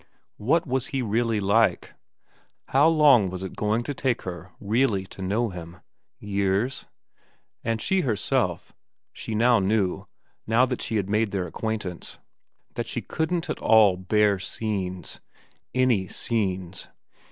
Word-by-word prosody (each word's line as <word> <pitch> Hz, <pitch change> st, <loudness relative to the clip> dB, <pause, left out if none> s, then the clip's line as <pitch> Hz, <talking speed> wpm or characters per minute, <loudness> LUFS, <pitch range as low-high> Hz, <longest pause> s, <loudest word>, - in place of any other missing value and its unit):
What 155 Hz, +11 st, +2 dB
was 130 Hz, -2 st, -1 dB
he 135 Hz, -2 st, -2 dB
really 115 Hz, 0 st, 0 dB
like? 105 Hz, +3 st, +2 dB, 0.8 s
How 140 Hz, +4 st, +5 dB
long 145 Hz, -, +5 dB
was 90 Hz, +1 st, -6 dB
it 95 Hz, -, -6 dB
going 110 Hz, +2 st, 0 dB
to 145 Hz, -, -4 dB
take 130 Hz, -3 st, -1 dB
her 90 Hz, 0 st, -7 dB
really 105 Hz, -2 st, +1 dB
to 95 Hz, -, -11 dB
know 105 Hz, +5 st, 0 dB
him? 90 Hz, -1 st, -9 dB, 0.4 s
Years? 100 Hz, +5 st, -1 dB, 0.8 s
And 115 Hz, 0 st, -1 dB
she 190 Hz, +10 st, +1 dB
herself, 110 Hz, -, -1 dB, 0.4 s
she 110 Hz, -, -5 dB
now 120 Hz, +1 st, +4 dB
knew, 95 Hz, -1 st, 0 dB, 0.4 s
now 115 Hz, +3 st, +4 dB
that 125 Hz, -1 st, -3 dB
she 115 Hz, -, -3 dB
had 100 Hz, -3 st, 0 dB
made 105 Hz, +1 st, +1 dB
their 95 Hz, -2 st, -2 dB
acquaintance, 100 Hz, 0 st, -4 dB, 0.6 s
that -, -, -4 dB
she -, -, -4 dB
couldn't 165 Hz, +2 st, -2 dB
at -, -, -3 dB
all 110 Hz, -4 st, +5 dB
bear 100 Hz, +2 st, +2 dB
scenes. 95 Hz, -3 st, -4 dB, 0.5 s
Any 125 Hz, -7 st, +2 dB
scenes. 95 Hz, -6 st, -2 dB
105 Hz, 140 wpm, -25 LUFS, 95-120 Hz, 0.8 s, How